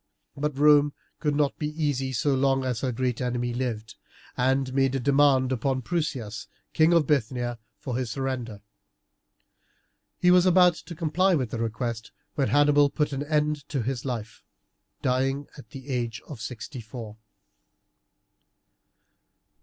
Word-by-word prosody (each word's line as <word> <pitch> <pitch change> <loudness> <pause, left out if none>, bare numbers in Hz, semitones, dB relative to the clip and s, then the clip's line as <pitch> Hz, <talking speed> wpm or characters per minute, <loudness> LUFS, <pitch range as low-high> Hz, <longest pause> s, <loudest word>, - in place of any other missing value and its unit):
But 150 -1 -2
Rome 145 0 +5 0.3
could 150 -2 0
not 145 -1 0
be 150 - -1
easy 145 -4 -1
so 135 +3 +1
long 135 0 +2
as 125 -3 -2
her 130 - 0
great 125 0 -2
enemy 120 -1 -1
lived, 115 -3 -4 0.4
and 130 +1 +1
made 135 0 +2
a - - 0
demand 135 -1 +3
upon 130 +1 -1
Prusias, 120 -10 -3 0.3
King 160 +1 +4
of 170 -3 +4
Bithynia, 120 -3 0 0.2
for 125 -4 -5
his 130 -2 -2
surrender. 125 -4 -4 1.6
He 180 - +4
was 180 0 +5
about 180 -1 +6
to 170 +1 -10
comply 175 +4 +2
with 130 -7 -2
the 115 - -3
request 115 0 -3 0.2
when 135 -3 0
Hannibal 145 0 +4
put 150 0 -1
an 135 - -2
end 150 -1 -1
to 135 -5 -1
his 130 +1 -3
life, 115 -5 -5 0.6
dying 135 +2 0
at 140 - -13
the 135 -2 -10
age 120 -3 -2
of 135 -8 -9
sixty 125 +3 -6
four. 110 -1 -9
135 Hz, 145 wpm, -26 LUFS, 120-145 Hz, 1.6 s, about